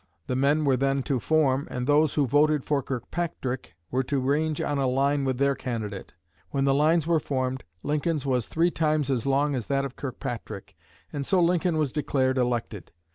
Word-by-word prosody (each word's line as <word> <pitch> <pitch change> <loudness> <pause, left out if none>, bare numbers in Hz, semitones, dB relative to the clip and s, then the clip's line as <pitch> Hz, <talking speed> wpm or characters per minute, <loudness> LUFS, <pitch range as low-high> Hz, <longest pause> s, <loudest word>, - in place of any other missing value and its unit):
The 125 - -2
men 145 +4 +2
were 135 -2 +4
then 135 +1 +1
to 135 -3 0
form, 140 -1 +2
and 125 -1 -3
those 145 +1 +3
who 145 - +3
voted 145 +2 +3
for 145 -2 +1
Kirkpatrick 130 - -4 0.2
were 130 - +1
to 140 +1 0
range 145 +4 0
on 145 -1 -1
a 135 - +1
line 140 +2 +1
with 130 -2 0
their 140 +1 +3
candidate. 110 -7 -5 0.3
When 135 0 0
the 135 - +3
lines 155 +3 +3
were 165 -1 +3
formed, 130 -2 -2 0.2
Lincoln's 150 0 -1
was 125 -4 0
three 170 +2 +1
times 155 -3 +1
as 130 0 -1
long 140 +2 +2
as 125 -5 -3
that 140 0 0
of 135 - -7
Kirkpatrick, 115 -6 -6 0.4
and 145 - -2
so 185 +6 +2
Lincoln 175 -1 +2
was 150 -4 0
declared 130 -3 +1
elected. 120 -7 -2
140 Hz, 190 wpm, -26 LUFS, 130-150 Hz, 0.4 s, were